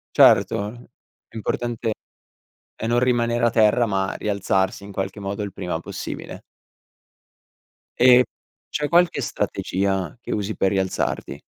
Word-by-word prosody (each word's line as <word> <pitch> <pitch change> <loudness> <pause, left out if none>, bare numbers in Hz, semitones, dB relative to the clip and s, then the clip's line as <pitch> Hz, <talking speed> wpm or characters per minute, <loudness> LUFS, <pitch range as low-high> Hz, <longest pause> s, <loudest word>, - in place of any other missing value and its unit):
Certo, 100 - +5
l 120 +3 -10 0.4
l'importante 115 +1 -2 0.8
è 115 - -4
non 120 +1 +3
rimanere 120 -1 +1
a 120 - +5
terra, 110 +1 +4
ma 95 -3 -1
rialzarsi 100 -1 -1
in 100 - -10
qualche 95 +2 -4
modo 100 +1 -4
il 100 - -5
prima 85 -2 -4
possibile. - - -7 1.6
E 125 0 +7 0.4
c'è 150 0 -2
qualche 175 +1 +3
strategia 95 0 -2
che - - -6
usi 105 0 -2
per 95 - +2
rialzarti? 95 -2 -2
105 Hz, 125 wpm, -23 LUFS, 95-120 Hz, 1.6 s, E